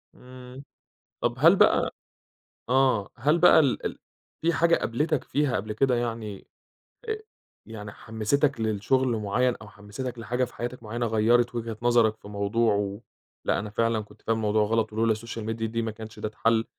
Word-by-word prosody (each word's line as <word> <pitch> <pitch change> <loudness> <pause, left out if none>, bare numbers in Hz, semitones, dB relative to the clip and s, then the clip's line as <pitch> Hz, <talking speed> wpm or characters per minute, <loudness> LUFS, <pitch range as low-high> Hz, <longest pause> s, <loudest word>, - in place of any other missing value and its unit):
إمم، 125 +1 -12 0.6
طَب 120 - 0
هل 165 +8 +6
بقى - - +3 0.8
آه، 125 -6 +3
هل 150 +4 +2
بقى 175 - +7
ال 140 -5 +1
ال - - -3 0.4
في 170 +1 +2
حاجة 170 0 +4
قابلتك 150 +5 -1
فيها 145 -3 0
قبل 105 +2 -3
كده 125 +3 +2
يعني، 115 -4 -4 0.6
آآ 435 -1 -2 0.4
يعني 105 -2 -8
حمستك 115 +7 -1
للشُغل 110 +5 +1
معيّن، 120 +4 +1
أو 110 - -12
حمستك 105 +5 -7
لحاجة 120 +3 -1
في - - -16
حياتك 120 0 -5
معيّنة، 120 +2 -3
غيّرت 115 +2 +2
وجهة 115 -2 -4
نظرك 120 -2 +3
في 100 - -14
موضوع 105 +3 +1
و 100 +1 -2 0.4
لأ، - - +1
أنا 105 +1 -5
فعلًا 115 +1 +1
كنت 105 0 -12
فاهم 115 - 0
الموضوع 105 -1 +2
غلط، 110 0 0
ولولا 110 0 +2
الSocial 115 0 -7
Media 115 0 -3
دي 115 +1 -2
ما 110 -1 -2
كانش 110 0 -10
ده - - -2
اتحل، 115 +1 +1
115 Hz, 170 wpm, -26 LUFS, 110-125 Hz, 0.8 s, بقى